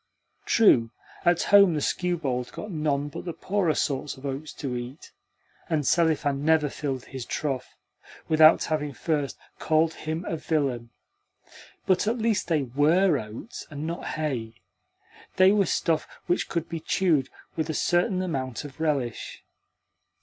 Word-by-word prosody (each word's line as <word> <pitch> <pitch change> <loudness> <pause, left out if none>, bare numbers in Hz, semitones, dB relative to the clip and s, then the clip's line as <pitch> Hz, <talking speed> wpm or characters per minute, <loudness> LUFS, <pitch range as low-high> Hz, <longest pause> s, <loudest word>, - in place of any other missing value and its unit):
True, 125 - +5 0.4
at 175 0 +3
home 200 -4 +6
the - - 0
skewbald 145 -7 -1
got 210 - -7
none 150 -3 0
but 145 - -7
the 170 - -5
poorer 190 -4 0
sorts 140 0 -2
of 130 - -11
oats 140 +2 -4
to 130 -3 -4
eat, 125 +4 -7 0.6
and 155 -3 0
Selifan 150 -4 +2
never 155 -1 +3
filled 135 -3 -4
his 130 -2 -7
trough 135 0 -3 0.5
without 155 0 +6
having 150 -2 -2
first 145 0 -2 0.2
called 160 +1 +2
him 160 +3 -4
a 165 - -2
villain; 140 -7 -1 1.0
but 185 +2 +2
at 230 +3 +1
least 225 -5 0
they 160 -4 +1
WERE 150 +6 +3
oats, 110 - -8
and 150 -1 -6
not 170 +1 -4
hay 125 -8 -3 0.8
they 185 +1 +6
were 200 -3 +3
stuff 160 -1 0 0.2
which 175 - 0
could 170 -1 -2
be 165 - -4
chewed 160 -4 +1 0.3
with 160 0 -2
a 160 - -2
certain 180 +4 +1
amount 130 -7 -3
of 145 +1 -11
relish. 140 -7 -2
155 Hz, 150 wpm, -26 LUFS, 135-170 Hz, 1.0 s, home